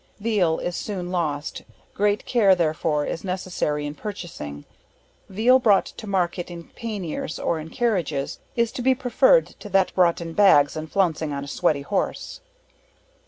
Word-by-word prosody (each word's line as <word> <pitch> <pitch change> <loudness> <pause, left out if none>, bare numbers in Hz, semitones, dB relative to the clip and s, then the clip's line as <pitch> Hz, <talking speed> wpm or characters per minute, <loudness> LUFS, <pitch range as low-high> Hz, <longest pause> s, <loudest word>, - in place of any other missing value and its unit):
Veal, 200 -7 +1
is 175 - -3
soon 180 -3 -4
lost 155 -5 -2 0.3
great 205 +1 +1
care 205 -6 +4
therefore 155 -3 0
is - - -4
necessary 180 -6 -2
in 145 - -4
purchasing. 150 - -7 0.6
Veal 235 +7 +4
bro't 210 -6 +4
to 215 - -9
market 180 -2 -1
in 170 -1 -8
panniers, 200 -9 -4
or 165 - -1
in 155 +1 -8
carriages, 170 - -1 0.2
is 235 -1 +1
to - - -5
be 260 +1 +3
prefered - - +4
to 205 - -12
that 195 -1 +2
bro't 175 -2 +3
in 165 -1 -6
bags, 160 -8 +5
and 155 0 -6
flouncing 165 -5 +1
on 140 0 -4
a - - -8
sweaty 150 -2 0
horse. 200 - -3
180 Hz, 160 wpm, -24 LUFS, 155-210 Hz, 0.6 s, bags